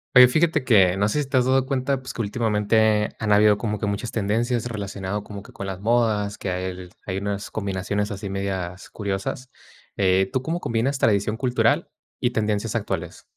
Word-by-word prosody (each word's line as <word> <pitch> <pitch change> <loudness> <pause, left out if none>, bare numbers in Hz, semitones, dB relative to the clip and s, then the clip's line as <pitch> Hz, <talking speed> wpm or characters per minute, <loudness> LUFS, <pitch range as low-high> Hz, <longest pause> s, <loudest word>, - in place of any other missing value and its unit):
Oye, 125 0 +10
fíjate 155 +1 +2
que 95 -6 +4
no 100 +1 +2
sé 150 +8 0
si 140 - -5
te 135 - +2
has 125 - +3
dado 130 0 +2
cuenta, 135 0 0
pues, 130 - -7
que - - -2
últimamente 105 -1 +2
han 110 -1 -1
habido 105 0 +5
como 105 -1 -2
que 105 - -3
muchas 100 +3 -3
tendencias 115 +3 0
relacionado 100 -3 -4
como 100 -1 -9
que - - -14
con 100 - -6
las 95 -1 -5
modas, 110 -2 +1
que 95 - -3
hay 90 0 -4 0.2
hay 95 -1 -3
unas 100 +1 -4
combinaciones 100 0 -2
así 100 -1 -5
medias 95 -1 -4
curiosas. 100 +5 -4 0.5
Eh, 95 0 +3
¿tú 130 - +1
cómo 165 +6 -2
combinas 120 +5 0
tradición 105 -2 +2
cultural 125 0 +1 0.3
y 120 - +1
tendencias 105 -1 -1
actuales? 115 - -3
105 Hz, 190 wpm, -23 LUFS, 100-120 Hz, 0.5 s, Oye